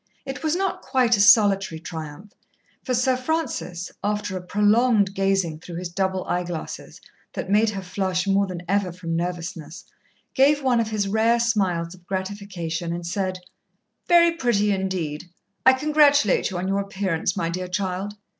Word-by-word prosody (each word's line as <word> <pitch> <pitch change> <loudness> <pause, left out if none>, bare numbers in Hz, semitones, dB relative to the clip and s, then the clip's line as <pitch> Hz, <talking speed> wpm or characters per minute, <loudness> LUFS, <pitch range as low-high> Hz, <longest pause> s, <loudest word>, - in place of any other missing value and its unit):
It 270 -1 -6
was 315 0 0
not 385 +1 -1
quite 255 -3 +2
a 200 - +1
solitary 200 -5 +5
triumph, 160 +3 -8 0.5
for 255 - -1
Sir 255 +2 +2
Francis, 255 - -3
after 205 -1 -2
a 185 - -4
prolonged 210 +2 +2
gazing 195 -5 0
through 170 +1 -9
his 175 0 -4
double 190 +1 -1
eye 180 - -1
glasses 175 -2 -7 0.3
that 190 - -5
made 215 +2 +4
her 195 -2 -5
flush 185 0 -1
more 200 0 +2
than 180 -2 -6
ever 195 -1 0
from 170 -1 -5
nervousness, 175 0 -5 0.5
gave 285 +2 +3
one 250 -3 +3
of 225 -1 0
his 210 -2 -1
rare 225 +3 +2
smiles 190 -7 0
of 175 -1 -18
gratification 185 -4 -4
and 170 0 -4
said: 185 0 -2 0.7
"Very 340 -1 +6
pretty 235 -10 +1
indeed. 185 -6 -2 0.4
I 260 - +9
congratulate 290 -5 +3
you 185 - -5
on 180 +1 -3
your 195 +1 0
appearance, 195 -4 -2
my 165 - -1
dear 180 +2 -4
child." 190 +2 -3
195 Hz, 165 wpm, -23 LUFS, 180-225 Hz, 0.7 s, I